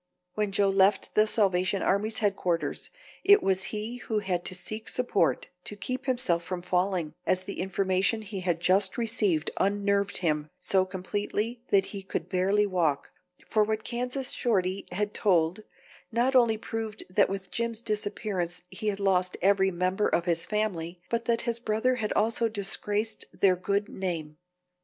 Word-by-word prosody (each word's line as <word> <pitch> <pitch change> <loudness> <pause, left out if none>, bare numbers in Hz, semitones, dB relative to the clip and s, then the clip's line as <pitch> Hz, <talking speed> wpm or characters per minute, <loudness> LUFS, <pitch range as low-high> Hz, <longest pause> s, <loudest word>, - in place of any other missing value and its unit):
When 210 -1 -1
Joe 200 0 +3
left 195 +1 +3
the 215 0 +4
Salvation 195 -3 +2
Army's 215 +3 +1
headquarters 185 -5 -1 0.3
it 405 0 +6
was 190 0 +1
he 215 +3 -3
who 225 -3 -3
had 185 -4 -1
to 185 - -4
seek 215 +5 -5
support 250 -5 +1 0.2
to 210 - -5
keep 255 +7 -4
himself 200 -10 +1
from 180 0 -5
falling, 180 -3 0
as 185 0 +2
the 200 - -6
information 190 +3 +1
he 200 -1 -5
had 175 -2 0
just 190 +2 +2
received 210 -9 +1
unnerved 200 0 +1
him 150 -4 0
so 190 -1 +2
completely 205 +5 -3
that 195 -1 +4
he 200 - -5
could 180 -2 -4
barely 195 +3 +2
walk, 170 -7 0 0.3
for 215 -1 +2
what 215 0 -2
Kansas 250 +2 -3
Shorty 195 -5 0
had 205 +3 -2
told 175 -1 +2 0.5
not 245 +4 +2
only 235 -3 +5
proved 220 -1 -4
that 200 +2 +4
with 195 -1 -5
Jim's 230 -1 -2
disappearance 205 -5 -2
he 215 - -5
had 205 -1 0
lost 185 -2 +1
every 195 0 +4
member 185 +3 0
of 170 - +1
his 170 -2 +1
family, 180 -5 -2
but 235 0 0
that 230 0 +1
his 235 -1 -1
brother 235 +3 +1
had 215 -3 -2
also 230 +1 +1
disgraced 210 +1 -2
their 190 -2 +3
good 200 +3 -1
name. 165 -7 -4
200 Hz, 160 wpm, -28 LUFS, 185-220 Hz, 0.5 s, it